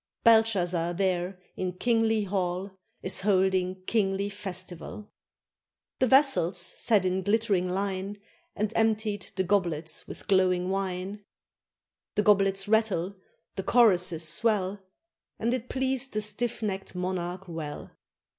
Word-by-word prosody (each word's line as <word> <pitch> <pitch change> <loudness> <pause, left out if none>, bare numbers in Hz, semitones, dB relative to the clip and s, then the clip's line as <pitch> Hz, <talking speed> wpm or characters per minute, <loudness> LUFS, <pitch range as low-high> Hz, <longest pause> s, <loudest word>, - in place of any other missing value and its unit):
Belshazzar 185 -7 +3
there 185 0 -1 0.2
in 185 -1 -3
kingly 225 +1 +1
hall 185 0 -2 0.3
Is 185 - +1
holding 190 -1 +1
kingly 200 -1 0
festival. 190 +1 -7 0.9
The 260 - +3
vassals 265 - +4
sat 190 +3 +1
in 185 +1 0
glittering 200 -2 +1
line, 195 +1 -3 0.4
And 210 +1 -2
emptied 220 -2 +1
the 190 - +1
goblets 170 -5 -1
with - - -9
glowing 185 -1 +2
wine. 195 +1 -3 0.9
The 210 - +2
goblets 195 -1 +3
rattle, 205 -4 +1 0.4
the 195 - -2
choruses 180 -8 +4
swell, 200 +2 +1 0.6
And 235 +2 0
it 250 -1 -4
pleased 265 0 -1
the 215 - 0
stiff 225 +2 -2
necked 195 -3 -4
monarch 180 0 -3
well. 160 -3 -6
195 Hz, 115 wpm, -28 LUFS, 180-215 Hz, 0.9 s, vassals